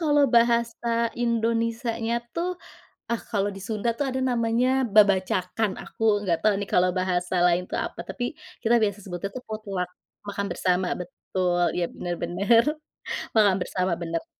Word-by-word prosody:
kalau 295 -3 +4
bahasa 235 0 +2 0.3
Indonesia 230 0 0
nya 230 +1 +1 0.2
tuh 340 +2 -1 0.6
ah 235 - +1
kalau 205 -1 +1
di 195 - -9
Sunda 220 +1 -1
tuh 285 - +1
ada 260 0 -2
namanya 235 +1 +1 0.3
babacakan, 195 0 +3
aku - - -15 0.2
nggak 175 -4 +1
tau 215 -1 +4
nih 200 - -4
kalau 180 0 +4
bahasa 180 0 0
lain 175 0 +3
tuh - - -2
apa, - - -8
tapi 245 - -4 0.4
kita 230 +1 +4
biasa 205 -1 +1
sebut 175 -2 -6
itu 200 +6 -7
potluck 200 -5 -4 0.4
makan 200 0 -2
bersama 180 0 +1
betul, 180 0 -1 0.2
ya - - +1
benar 175 0 -3
benar, 200 +7 +4 0.7
makan 205 -4 +5
bersama 185 0 -1
benar. 165 0 -2
205 Hz, 155 wpm, -25 LUFS, 185-230 Hz, 0.7 s, makan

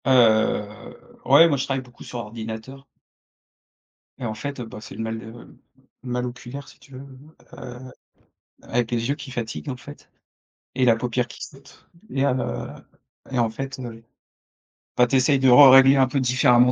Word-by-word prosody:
Heu, 110 -4 +1
ouais, 145 +6 +7
moi, 145 -4 +1
je 135 - -1
travaille 135 -1 -2
beaucoup 125 -1 -15
sur 125 - -7
ordinateur. 115 +4 -8 1.3
Et 125 - -5
en 110 - -3
fait, 135 +6 -6
heu, 120 - -5
bah, 110 -1 -10
c'est 115 - -11
le - - -6
mal 110 0 -4
de 115 - -11 0.8
le 130 - -8
mal 125 0 -1
oculaire, 125 +3 -8
si - - -17
tu 140 - -19
veux, 130 - -9 0.5
heu, 125 +1 -10 0.7
avec 120 -1 -2
les 120 +1 -1
yeux 140 - +1
qui 140 -2 -10
fatiguent 120 +3 -5
en 130 - -4
fait 145 +4 -13 0.7
et 130 - +2
la 115 -2 +4
paupière 120 +1 -2
qui - - -13
saute 135 -1 -14 0.2
et 135 0 0
heu 130 -2 -1 0.6
et 130 - -2
en 115 -1 +2
fait, 135 +4 -6
le 115 -3 -8 1.0
bah, 125 - +6
tu 135 - 0
essayes 135 +1 +3
de 130 0 +4
rerégler 135 +1 +8
un 130 -1 +4
peu 135 +2 -1
différemment 125 -1 +4
125 Hz, 180 wpm, -23 LUFS, 115-135 Hz, 1.3 s, rerégler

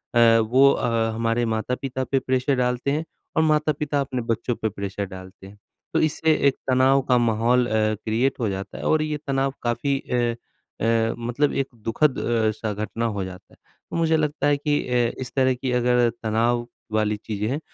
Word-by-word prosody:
अ, 115 -1 +6
वो 130 +5 +5
अ, 115 -3 0
हमारे 115 +1 0
माता-पिता 125 +3 -3
पे 135 - +3
प्रेशर 130 +1 0
डालते 125 +1 0
हैं 155 +3 -1 0.3
और 160 - +3
माता-पिता 150 -1 +1
अपने 130 -2 -3
बच्चों 115 +2 -1
पे 110 - +1
प्रेशर 100 0 -4
डालते 95 0 -11
हैं। 100 +1 -14 0.4
तो - - +3
इससे 160 +1 +1
एक 135 - +2
तनाव 130 +1 +4
का 125 - +5
माहौल 120 +1 +2
अ, - - -6
क्रिएट 110 +4 0
हो 115 -4 0
जाता 95 +1 -5
है - - -7
और 155 - +2
ये 155 -1 -2
तनाव 135 0 0
काफ़ी 135 +4 0
अ 120 -1 +1 0.5
अ, 115 0 +2
मतलब 120 +5 0
एक 135 - -4
दुखद 120 +5 0
अ, 115 -2 +1
सा 110 -2 -3
घटना 110 +3 -3
हो 100 - -2
जाता 90 -1 -11
है। - - -21 0.4
मुझे 160 -1 +3
लगता 150 -2 0
है 145 0 +3
कि 145 0 0
अ, 120 -2 +1
इस 125 -1 -5
तरह 130 -1 +3
की 125 +1 -3
अगर 125 -1 +3
तनाव 120 +2 +1 0.2
वाली 105 -1 +1
चीज़ें 105 -1 -2
हैं 140 +4 -1
120 Hz, 190 wpm, -23 LUFS, 110-135 Hz, 0.5 s, अ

